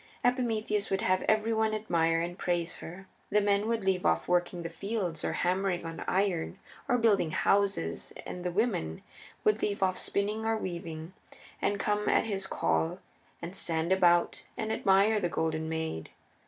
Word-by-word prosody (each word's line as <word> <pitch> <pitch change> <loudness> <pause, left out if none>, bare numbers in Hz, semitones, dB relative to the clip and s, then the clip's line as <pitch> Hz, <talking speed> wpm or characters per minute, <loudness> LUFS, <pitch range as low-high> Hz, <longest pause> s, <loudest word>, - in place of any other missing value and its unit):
Epimetheus 220 -4 +1
would 195 0 0
have 185 0 +2
every 215 +1 +2
one 220 0 +1
admire 165 -6 +1
and 175 +1 -4
praise 175 -1 -1
her. 180 +4 -9 0.2
The 210 - +4
men 205 +1 +2
would 225 -3 -1
leave 190 -1 +1
off 80 0 +2
working 175 0 +1
in - - -7
the 165 - -4
fields, 185 -3 -3
or - - -1
hammering 180 -1 0
on 165 0 -6
iron, 185 -3 0 0.3
or 245 - +4
building 210 -8 +3
houses, 195 - +1
and 180 - -6
the 180 - 0
women 180 - -1 0.4
would 215 +1 +3
leave 200 -2 0
off 185 -1 +1
spinning 210 +2 -1
or 225 0 +1
weaving, 170 -3 -5 0.5
and 205 - +1
come 210 +1 0
at - - +4
his 195 -3 -2
call, 170 -2 0 0.5
and 175 +3 -5
stand 165 -2 -1
about 175 -2 +3
and 220 0 -1
admire 200 +1 +4
the 175 -3 0
Golden 160 -1 -1
Maid. 160 - -3
190 Hz, 170 wpm, -30 LUFS, 170-210 Hz, 0.5 s, The